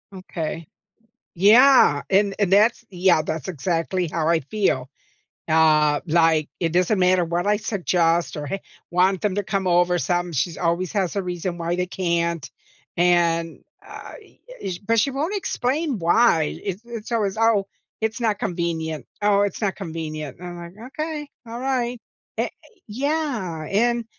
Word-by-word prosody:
Okay, 165 -3 -5 0.7
yeah, 215 - +6
and 200 +1 +3
and 195 -2 +1
that's 220 +4 +4
yeah, 180 -3 +3
that's 155 -1 -4
exactly 175 +1 -1
how 155 0 -2
I 165 -1 +3
feel. 135 -6 -1 0.6
Uh, 155 -2 +4
like, 160 -2 +3
it 165 -2 0
doesn't 185 +3 +2
matter 180 -1 +3
what 170 +3 -2
I 210 0 +3
suggest 175 -6 0
or 150 -1 -5
hey 195 +7 -4 0.3
want 185 +1 +2
them 205 -2 0
to 205 - +1
come 195 -1 -2
over 175 0 +3
some, 175 0 -1
she's 160 +3 -1
always 175 +2 0
has 195 -3 -1
a 200 - 0
reason 180 -1 -4
why 170 0 -2
they 180 - -1
can't, 170 -5 -1 0.5
and, 170 -2 +2 0.2
I - - -12 0.2
I - - -3
sh 175 - -4
but, 225 +3 +1
she 275 - +1
won't 305 +9 -2
explain 280 - -1
why, 170 -2 +3
it's 195 +2 -4
it's 235 -1 -7
always, 215 -2 0
"Oh, 225 -3 +3 0.4
it's 220 +2 -1
not 215 -3 +1
convenient, 165 -3 -3 0.2
oh, 205 -1 +4
it's 205 +2 -2
not 195 -2 0
convenient," 155 -6 -6
and 180 +1 -8
I'm 175 - -8
like, 170 +1 -10 0.2
"Okay, 305 -2 -3 0.2
alright." 245 0 -2 0.4
Eh - - 0 0.4
yeah, 240 - -2
and 235 +3 +1
180 Hz, 155 wpm, -23 LUFS, 165-215 Hz, 0.7 s, yeah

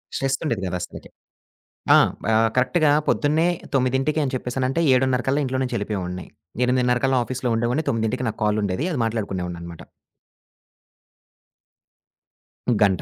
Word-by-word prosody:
స్ట్రెస్సుండేది 135 -5 -1
కాదు 90 0 -2
అస్సలకి. 90 - -8 0.9
ఆ! - - +8 0.3
బా 110 +1 +2 0.2
కరెక్ట్‌గా 150 +5 +3 0.2
పొద్దున్నే 155 +3 +2 0.3
9:00కి 135 +4 +1
అని 135 - -2
చెప్పేసనంటే 130 +4 -1
7:30కల్లా 130 +1 +2
ఇంట్లోనుంచి 130 -1 -1
ఎళ్ళిపోయేవాడ్ని. 90 -4 -4 0.4
8:30కల్లా 125 +1 +2
ఆఫీస్‌లో 125 0 -3
ఉండేవాడ్ని 125 +7 0
9:00కి 115 +1 -1
నాకు 110 - -6
కాల్ 105 0 +1
ఉండేది. 100 - -1
అది 140 - -2
మాట్లాడుకునేవాడిననమాట. 90 -6 -4 3.0
గంట. 95 -4 +3
125 Hz, 105 wpm, -23 LUFS, 105-135 Hz, 3.0 s, ఆ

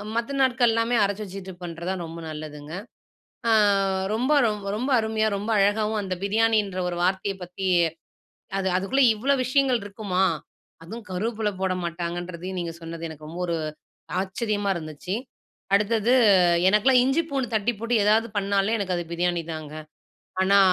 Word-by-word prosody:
மத்த 235 +4 -1
நாட்கள் 250 -3 +3
எல்லாமே 230 +1 +1
அரச்சு 200 +1 -1
வெச்சுக்கிட்டு 190 -2 -9
பன்றதான் 175 +2 -4
ரொம்ப 165 +1 -8
நல்லதுங்க. 150 0 -8 0.8
அ - - +5 0.6
ரொம்ப 250 +5 0 0.5
ரொம்ப 255 +6 -2
அருமையா 220 0 0
ரொம்ப 205 +3 -4
அழகாவும் 210 +2 +2
அந்த 190 -2 -2
பிரியாணின்ற 215 -2 +2
ஒரு 175 - -3
வார்த்தையை 190 +2 0
பத்தி, 180 +2 -5 0.9
அது 190 - -1
அதுக்குள்ள 230 +9 +2
இவ்வளவு 265 +5 +1
விஷயங்கள் 260 -1 +2
இருக்குமா? 195 -2 -1 0.6
அதுவும் 220 +6 -8
கருவேப்பில 215 +3 -1
போட 190 -1 +1
மாட்டாங்கன்றதையும் 175 +2 -4
நீங்க 170 -1 -4
சொன்னது 165 0 -6
எனக்கு 155 -1 -10
ரொம்ப 165 +3 -7
ஒரு 170 - 0 0.7
ஆச்சரியமா 205 +1 -2
இருந்துச்சு 155 +2 -5 0.6
அடுத்தது 220 +3 +3 0.5
எனக்கெல்லாம் 230 +6 +5
இஞ்சி 270 +6 +2
பூண்டு 270 -4 -1
தட்டி 220 +2 +2
போட்டு 230 +2 -2
ஏதாவது 220 +2 +3
பண்ணாலே 200 +2 +1
எனக்கு 190 -4 -1
அது 175 - -2
பிரியாணி 175 0 0
தாங்க. 155 -1 -7 0.7
ஆனா 200 +1 +5
200 Hz, 140 wpm, -25 LUFS, 175-225 Hz, 0.9 s, அ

